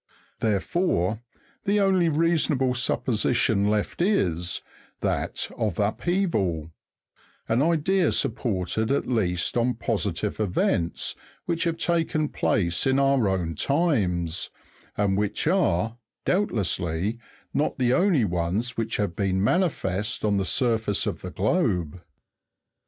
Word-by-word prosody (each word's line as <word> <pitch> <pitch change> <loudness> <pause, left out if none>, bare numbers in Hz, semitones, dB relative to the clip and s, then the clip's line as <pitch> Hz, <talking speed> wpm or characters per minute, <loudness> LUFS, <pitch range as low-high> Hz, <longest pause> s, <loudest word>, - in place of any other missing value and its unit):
Therefore, 110 - 0 0.4
the 205 +1 +2
only 190 -4 +3
reasonable 155 -5 +2
supposition 115 -3 +1
left 105 +8 -1
is, 90 - 0 0.4
that - - -1
of 105 -6 -1
upheaval; 100 - 0 0.8
an 115 +3 +2
idea 170 +4 +2
supported 110 -1 -1
at 140 - +1
least 90 -8 0
on 120 +1 +1
positive 105 -3 -2
events 90 -4 0 0.3
which 170 0 0
have 165 -1 0
taken 165 -3 0
place 90 +2 0
in 130 0 +3
our 135 -5 +3
own 90 -4 -1
times, 90 - 0 0.5
and 100 -2 +2
which 105 0 -1
are, 115 - +1 0.3
doubtlessly, 100 - 0 0.3
not 145 - 0
the 125 -2 +2
only 175 - +3
ones 90 +7 -1
which 115 -1 -2
have 100 -5 -1
been 95 -1 0
manifest 110 - 0
on 105 -1 +2
the 95 - 0
surface 115 -2 +1
of - - -3
the - - -5
globe. 85 -1 0
110 Hz, 115 wpm, -25 LUFS, 95-150 Hz, 0.8 s, only